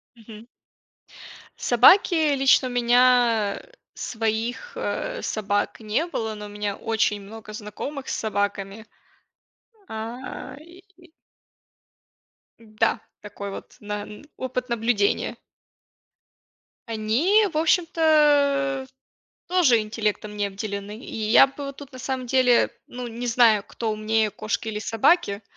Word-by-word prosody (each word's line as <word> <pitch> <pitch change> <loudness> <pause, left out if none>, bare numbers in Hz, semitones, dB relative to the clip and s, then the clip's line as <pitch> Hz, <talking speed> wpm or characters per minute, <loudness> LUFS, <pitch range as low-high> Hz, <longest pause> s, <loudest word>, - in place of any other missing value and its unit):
Мгм. 225 0 -13 1.1
Собаки, 305 - +5
лично 270 -1 +4
у - - -5
меня 240 -3 +3 0.3
своих, 230 - -3
э, - - -3
собак 205 0 -2
не 220 +9 -1
было, 220 -9 -3
но 210 0 -8
у - - -9
меня 205 -1 -3
очень 220 -2 0
много 215 +1 -11
знакомых 225 +7 -7
с - - -1
собаками. 205 0 -3 1.0
А 240 +4 -7
и 350 +1 -18 1.5
М-да, 215 -1 -1 0.2
такой 200 -1 -7 0.2
на 210 0 -5
н 210 +7 -11
опыт 255 -1 -4
наблюдения. 225 -3 0 1.5
Они, 250 - +2
в - - -1
общем-то, 295 -5 +3 0.6
тоже 320 -11 +4
интеллектом 215 -1 -3
не 205 -1 0
обделены. 200 +1 -6
И - - -10 0.2
я 270 - +8
бы 280 +1 -8
вот 275 0 -7
тут, 285 -1 -12
на 255 - -10
самом 260 0 -4
деле, 250 -1 +3 0.2
ну, 245 0 -7
не 235 +1 -6
знаю, 225 -4 +4
кто 225 -2 -4
умнее, 215 0 0
кошки 215 +2 -3
или 210 - -3
собаки. 225 - +2
230 Hz, 115 wpm, -24 LUFS, 215-275 Hz, 1.5 s, я